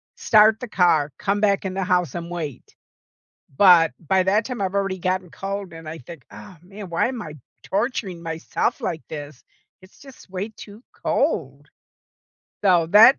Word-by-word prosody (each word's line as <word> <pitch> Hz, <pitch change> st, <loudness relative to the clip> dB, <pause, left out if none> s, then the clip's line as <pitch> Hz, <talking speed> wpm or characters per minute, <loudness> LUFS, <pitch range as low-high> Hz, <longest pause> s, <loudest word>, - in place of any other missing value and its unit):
start 220 Hz, -, +5 dB
the 250 Hz, -, -6 dB
car, 160 Hz, -7 st, +2 dB
come 200 Hz, +1 st, -1 dB
back 200 Hz, -1 st, +2 dB
in 185 Hz, -, -3 dB
the 190 Hz, 0 st, -2 dB
house, 180 Hz, -6 st, +1 dB
and 170 Hz, 0 st, -5 dB
wait. 155 Hz, -7 st, -6 dB, 0.8 s
But 175 Hz, -3 st, +6 dB
by 185 Hz, +3 st, +1 dB
that 205 Hz, +4 st, +2 dB
time, 250 Hz, -5 st, -5 dB
I've 190 Hz, 0 st, -2 dB
already 195 Hz, -1 st, 0 dB
gotten 185 Hz, 0 st, -1 dB
cold 195 Hz, 0 st, -5 dB
and 165 Hz, -1 st, -10 dB
I 160 Hz, +1 st, -6 dB
think, 140 Hz, +1 st, -12 dB
"Oh, 190 Hz, -5 st, -12 dB
man. 195 Hz, +1 st, -10 dB
Why 170 Hz, +6 st, +1 dB
am 245 Hz, -4 st, -5 dB
I 155 Hz, -4 st, -8 dB, 0.3 s
torturing 200 Hz, -5 st, -2 dB
myself 165 Hz, 0 st, -2 dB
like 160 Hz, -, -3 dB
this? 145 Hz, -3 st, -8 dB, 0.4 s
It's 185 Hz, -, -19 dB
just 270 Hz, -8 st, -15 dB
way 190 Hz, +4 st, -4 dB
too 215 Hz, +1 st, -13 dB
cold." 145 Hz, -, -1 dB, 1.0 s
So 175 Hz, -4 st, +4 dB
that 220 Hz, -, +8 dB
185 Hz, 170 wpm, -23 LUFS, 165-205 Hz, 1.0 s, that